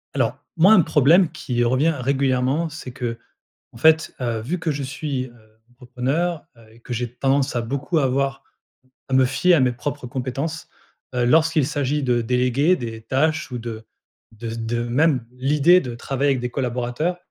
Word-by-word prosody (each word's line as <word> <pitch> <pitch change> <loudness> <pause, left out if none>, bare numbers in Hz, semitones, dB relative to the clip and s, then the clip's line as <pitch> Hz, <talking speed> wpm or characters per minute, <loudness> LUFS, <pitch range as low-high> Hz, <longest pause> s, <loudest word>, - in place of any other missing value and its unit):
Alors, 125 -1 0 0.2
moi 185 +6 +7
un 190 - +7
problème 155 +3 +4
qui 130 -6 -2
revient 135 +7 +2
régulièrement 135 +3 0
c'est 150 -4 -8
qu'en 120 -2 -7 0.4
fait, 160 +5 +3
heu, 120 -3 -2
vu 150 +12 -3
que 165 - -2
je 145 -1 -3
suis, 135 0 -3
heu, 110 -3 -21
entrepreneur, 135 +7 -2
heu, 115 -1 -18
et 115 - -19
que 125 - -8
j'ai 120 0 -3
tendance 135 +2 +1
à - - +1
beaucoup 140 +7 -2
avoir 135 0 0 0.7
à 130 - -1
me 130 0 +5
fier 175 +7 +3
à 160 - +4
mes 125 -1 +2
propres 130 +2 -5
compétences, 135 +6 -4 0.5
heu, 125 -1 +1
lorsqu'il 160 +1 +3
s'agit 145 0 -1
de 120 -3 +1
déléguer 125 +8 +2
des 115 -4 -6
tâches 155 +6 0
ou 125 - -4
de 115 -1 -7 0.5
de 115 +1 -7
z 115 - -5
de 120 +1 -1
même 130 0 +1
l'idée 145 +7 +4
de 125 -6 -6
travailler 135 +4 -1
avec 130 - -2
des 125 0 -3
collaborateurs, 125 +6 -2
130 Hz, 175 wpm, -22 LUFS, 120-150 Hz, 0.7 s, moi